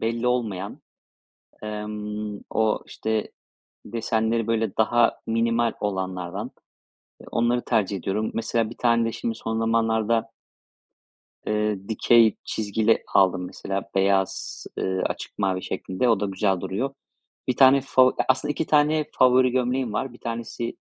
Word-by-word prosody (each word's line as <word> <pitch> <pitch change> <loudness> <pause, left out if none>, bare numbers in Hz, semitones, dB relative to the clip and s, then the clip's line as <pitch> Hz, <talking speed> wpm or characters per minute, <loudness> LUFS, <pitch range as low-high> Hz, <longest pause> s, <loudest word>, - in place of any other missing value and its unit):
belli 115 +2 -1
olmayan, 110 -6 -2 0.8
emm, 105 0 -5
o 110 -1 +1
işte, 110 -1 -3 0.5
desenleri 115 0 -1
böyle 115 -3 0
daha 115 +1 +3
minimal 115 0 +1
olanlardan, 95 -3 -3 0.8
onları 120 +1 +1
tercih 105 -4 0
ediyorum. 100 +4 -2
Mesela 115 0 0
bir 120 - -10
tane 115 -1 +2
de - - -4
şimdi 115 0 -3
son 110 0 -3
zamanlarda 115 0 +1 1.1
eee 105 -2 -1
dikey 115 0 +4
çizgili 110 +1 +1
aldım 95 -2 +3
mesela 95 +1 -4
beyaz, 95 0 0
eee, 95 0 -1
açık - - -6
mavi 95 -2 0
şeklinde 95 +7 -2
o 110 -4 +3
da 105 - 0
güzel 95 -1 0
duruyor. 130 +11 -3 0.5
Bir 125 - +1
tane 135 0 +7
favo 130 -1 +3
aslında 130 +3 +2
2 155 - -2
tane 150 +1 +3
favori 130 0 +5
gömleğim 125 -2 0
var. 130 +4 -2
Bir 120 - -14
tanesi 115 0 -4
110 Hz, 130 wpm, -24 LUFS, 105-120 Hz, 1.1 s, tane